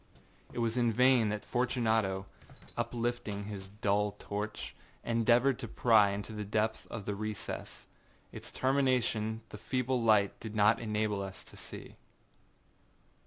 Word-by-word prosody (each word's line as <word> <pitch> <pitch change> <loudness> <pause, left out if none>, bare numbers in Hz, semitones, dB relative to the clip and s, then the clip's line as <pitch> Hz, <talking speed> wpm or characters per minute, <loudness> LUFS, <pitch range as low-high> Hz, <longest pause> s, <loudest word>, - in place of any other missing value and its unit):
It - - -10
was 115 0 0
in 120 -2 +3
vain 125 -1 +4
that 105 0 -3
Fortunato, 110 -6 +1 0.5
uplifting 120 -4 -2
his 100 -2 -6
dull 105 0 0
torch, 105 - -4 0.3
endeavored 120 +3 +3
to - - -4
pry 110 -4 +5
into 100 +2 -4
the 105 -1 -4
depths 110 +2 -1
of 110 -4 -6
the 105 - -1
recess. 110 +1 -5 0.5
Its - - -8
termination 125 -5 +1
the 105 - -9
feeble 125 +2 0
light 105 -3 +3
did 110 -1 -7
not 105 +1 +5
enable 105 -2 -1
us 95 -1 -6
to - - -13
see. - - -9
110 Hz, 135 wpm, -32 LUFS, 105-120 Hz, 0.5 s, pry